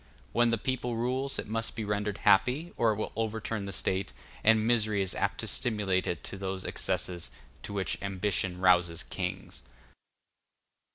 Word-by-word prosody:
When 120 Hz, 0 st, +4 dB
the 115 Hz, -, +2 dB
people 125 Hz, 0 st, -2 dB
rules, 130 Hz, +4 st, -1 dB
it -, -, -2 dB
must 115 Hz, +1 st, -2 dB
be 110 Hz, -, -3 dB
rendered 105 Hz, 0 st, -1 dB
happy, 135 Hz, -, +3 dB
or 115 Hz, -2 st, +3 dB
it -, -, 0 dB
will 110 Hz, -, -3 dB
overturn 110 Hz, -1 st, -2 dB
the 100 Hz, -, -4 dB
State, 95 Hz, 0 st, -1 dB, 0.3 s
and 110 Hz, 0 st, +5 dB
misery 110 Hz, -4 st, +3 dB
is 95 Hz, -, -2 dB
apt -, -, -1 dB
to -, -, -4 dB
stimulate 105 Hz, -5 st, +1 dB
it 85 Hz, -, -2 dB
to -, -, -7 dB
those 95 Hz, -1 st, -3 dB
excesses 90 Hz, -2 st, -1 dB, 0.3 s
to -, -, -6 dB
which 95 Hz, -4 st, -2 dB
ambition 95 Hz, -2 st, -1 dB
rouses 90 Hz, -1 st, +4 dB
kings. 90 Hz, -8 st, -4 dB
105 Hz, 165 wpm, -30 LUFS, 95-115 Hz, 0.3 s, and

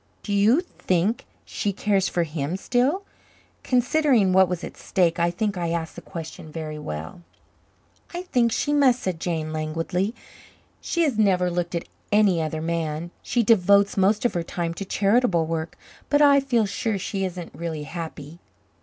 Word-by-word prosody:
"Do 205 Hz, -, -3 dB
you 215 Hz, +10 st, +4 dB
think 200 Hz, -, -1 dB, 0.2 s
she 205 Hz, -, -2 dB
cares 195 Hz, -1 st, +1 dB
for 175 Hz, -, 0 dB
him 155 Hz, +1 st, -3 dB
still?" 260 Hz, -, +1 dB, 0.6 s
Considering 250 Hz, -5 st, +3 dB
what 190 Hz, -1 st, +5 dB
was 180 Hz, -1 st, -3 dB
at -, -, -7 dB
stake, 175 Hz, -2 st, 0 dB
I 170 Hz, 0 st, +3 dB
think 195 Hz, +3 st, -2 dB
I 170 Hz, -1 st, -1 dB
asked 165 Hz, -1 st, -3 dB
the -, -, -8 dB
question 160 Hz, -3 st, -8 dB
very 155 Hz, -1 st, -5 dB
well. 80 Hz, -, -6 dB, 0.9 s
"I 350 Hz, +1 st, -5 dB
think 245 Hz, -9 st, +1 dB
she 290 Hz, +5 st, 0 dB
must," 265 Hz, -4 st, +4 dB
said 180 Hz, -3 st, -2 dB
Jane 160 Hz, -2 st, -2 dB
languidly. 165 Hz, +7 st, -2 dB, 0.7 s
"She 340 Hz, -, 0 dB
has 270 Hz, -9 st, 0 dB
never 185 Hz, -4 st, +3 dB
looked 175 Hz, 0 st, -2 dB
at 170 Hz, -, -3 dB, 0.2 s
any 205 Hz, -5 st, +4 dB
other 155 Hz, 0 st, -3 dB
man. 165 Hz, 0 st, -2 dB
She 240 Hz, -, 0 dB
devotes 200 Hz, -2 st, +4 dB
most 205 Hz, +4 st, +2 dB
of 240 Hz, -, +2 dB
her 175 Hz, -, -1 dB
time 170 Hz, 0 st, -3 dB
to 195 Hz, -, -6 dB
charitable 200 Hz, -3 st, +2 dB
work, 160 Hz, 0 st, -4 dB, 0.3 s
but 290 Hz, -, +3 dB
I 285 Hz, -1 st, +6 dB
feel 245 Hz, -5 st, +1 dB
sure 205 Hz, +1 st, -2 dB
she 195 Hz, +1 st, -3 dB
isn't 180 Hz, -2 st, -5 dB
really 160 Hz, -3 st, -4 dB
happy." 160 Hz, 0 st, -7 dB
185 Hz, 170 wpm, -24 LUFS, 165-220 Hz, 0.9 s, I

